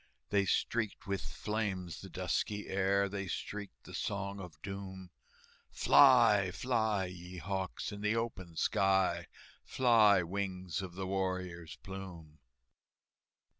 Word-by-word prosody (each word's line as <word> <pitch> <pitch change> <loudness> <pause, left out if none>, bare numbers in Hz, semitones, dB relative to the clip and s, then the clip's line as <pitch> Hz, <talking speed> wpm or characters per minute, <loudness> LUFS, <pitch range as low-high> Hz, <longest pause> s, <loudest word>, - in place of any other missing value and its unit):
They 100 -1 +3
streaked 110 +3 0
with 100 -1 -2
flames 100 -6 -3
the - - -9
dusky 105 -1 -2
air, 100 +1 +2
They 100 0 -4
streaked 100 +4 -6
the - - -12
Song 100 0 -3
of 90 -5 -10
Doom, 95 -2 -7 0.6
"Fly, 100 -3 +6
fly, 110 -1 0
ye 90 0 -9
hawks, 95 +1 -3
in 100 0 -7
the 105 +2 +1
open 95 -7 -3
sky, 95 -1 +2 0.4
Fly, 110 -7 +5
wings 95 -1 -3
of 90 -2 -7
the 95 0 -3
warrior's 90 -4 -3
plume!" 90 -6 -9
95 Hz, 120 wpm, -33 LUFS, 90-100 Hz, 0.6 s, Fly